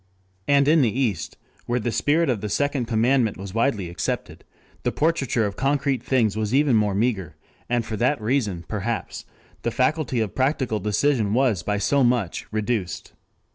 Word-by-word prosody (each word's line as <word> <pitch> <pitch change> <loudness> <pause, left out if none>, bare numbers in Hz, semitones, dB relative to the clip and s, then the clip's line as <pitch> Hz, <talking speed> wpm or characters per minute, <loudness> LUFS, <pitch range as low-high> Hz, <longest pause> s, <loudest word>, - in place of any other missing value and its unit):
And 140 0 +4
in 160 +1 +5
the 120 - +3
East, 105 -12 -1 0.3
where 120 +1 0
the 120 +1 -2
spirit 160 +7 +2
of 120 -6 0
the 105 - -3
second 140 +1 0
commandment 115 0 +2
was 95 0 -8
widely 115 -5 0
accepted, 85 -3 -4 0.4
the - - 0
portraiture 140 -8 +1
of 100 - -3
concrete 140 -2 0
things 115 -6 +1
was 110 +2 -1
even 140 -3 +4
more 105 -2 +2
meager, 100 -8 -1 0.3
and 120 -1 0
for 110 - -4
that 125 +5 +1
reason 105 -7 -1
perhaps 110 +2 -4 0.4
the 120 - -1
faculty 130 +1 0
of 110 -4 -1
practical 130 -5 0
decision 105 +1 +1
was 125 -8 +2
by 105 +4 -1
so 140 +7 +2
much 120 -7 0
reduced. 105 -6 -2
120 Hz, 170 wpm, -23 LUFS, 105-135 Hz, 0.4 s, in